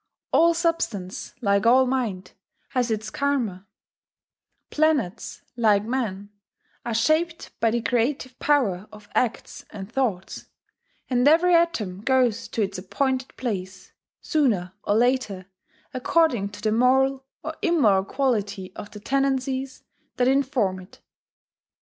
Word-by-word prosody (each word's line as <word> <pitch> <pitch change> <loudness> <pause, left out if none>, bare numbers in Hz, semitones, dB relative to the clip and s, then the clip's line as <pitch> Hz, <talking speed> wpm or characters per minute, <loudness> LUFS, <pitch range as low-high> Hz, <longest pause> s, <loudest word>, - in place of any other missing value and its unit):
All 335 0 +5
substance, 280 - -2
like 200 0 +2
all 260 +2 +6
mind, 225 -8 -2 0.4
has 250 -2 0
its 215 -1 -3
Karma; 235 -10 -1 1.0
planets, 285 - 0
like 215 -4 +3
men, 210 -4 -3 0.5
are 235 -2 -3
shaped 320 +8 +1
by 225 - +3
the 235 +1 -1
creative 255 +1 -1
power 215 -10 +1
of 210 -1 -14
acts 245 -3 -2
and 200 0 -9
thoughts; 230 -8 -2 0.6
and 250 +1 +2
every 335 +4 +5
atom 220 - +1
goes 250 -3 +2
to 225 - -1
its 195 -1 -3
appointed 260 +7 -2
place, 185 -6 -5 0.3
sooner 210 - 0
or 205 - +1
later, 235 -5 +1 0.5
according 255 -6 +1
to 205 0 -12
the 215 - +2
moral 265 +3 +3 0.2
or - - -5
immoral 265 - +3
quality 205 -6 -2
of 205 - -8
the 210 - -10
tendencies 270 +2 -1 0.3
that 245 - +2
inform 260 -8 +1
it. 185 +1 -15
240 Hz, 125 wpm, -24 LUFS, 200-270 Hz, 1.0 s, all